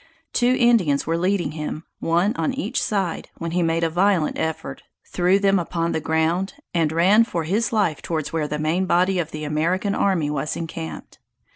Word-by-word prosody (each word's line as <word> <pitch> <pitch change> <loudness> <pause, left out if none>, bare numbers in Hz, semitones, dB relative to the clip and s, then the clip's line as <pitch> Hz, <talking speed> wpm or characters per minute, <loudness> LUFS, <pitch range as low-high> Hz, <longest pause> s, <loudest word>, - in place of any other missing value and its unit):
Two 250 +1 +3
Indians 210 -13 +3
were 165 - 0
leading 180 +2 0
him, 155 0 -5 0.2
one 175 +7 +1
on 265 - -1
each 290 - -2
side, 195 -5 -2
when 165 0 -4
he 180 +1 +1
made 165 0 +1
a 165 - +2
violent 180 -2 +2
effort, 160 0 -3 0.2
threw 180 +2 +2
them 195 -1 +3
upon 170 -1 -2
the - - -1
ground, 165 - 0 0.2
and 165 -3 +1
run 190 +7 +5
for 175 -7 -3
his 205 +9 0
life 200 -9 +1
towards 160 -3 -3
where 155 -2 0
the 150 - -3
main 165 +5 0
body 185 +2 +2
of 165 -2 -2
the 155 -1 -6
American 170 +7 0
army 175 -9 +1
was 150 +1 -2
encamped. 165 0 -7
170 Hz, 185 wpm, -22 LUFS, 160-195 Hz, 0.2 s, run